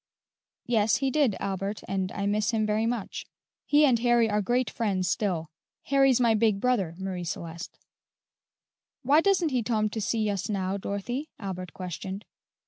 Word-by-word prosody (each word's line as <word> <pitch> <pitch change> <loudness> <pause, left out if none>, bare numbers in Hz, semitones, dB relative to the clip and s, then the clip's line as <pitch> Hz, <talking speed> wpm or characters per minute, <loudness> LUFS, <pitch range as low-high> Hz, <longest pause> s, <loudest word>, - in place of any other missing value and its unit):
"Yes, 220 -3 +2
he 270 -1 0
did, 280 -9 +2
Albert, 195 +1 -3
and 190 -1 -2
I 200 - -2
miss 205 +1 +1
him 220 -2 +1
very 215 +1 +1
much. 235 -4 -4 0.4
He 295 +1 +5
and 250 -5 +3
Harry 240 -1 +3
are 210 -1 +1
great 245 +4 +1
friends 195 -5 -1
still. 180 -5 -1 0.3
Harry's 270 -2 +4
my 235 -2 +4
big 215 -2 +2
brother, 200 -9 0
Marie 190 -2 -4
Celeste." 170 0 -6 1.3
"Why 290 +5 +5
doesn't 370 -3 +2
he 255 -3 0
tom 215 -2 0
to 220 - -3
see 215 +1 0
us 200 0 -3
now, 195 -1 -1
Dorothy?" 240 +10 -4
Albert 185 -3 -6
questioned. 190 +2 -6
215 Hz, 160 wpm, -27 LUFS, 190-245 Hz, 1.3 s, He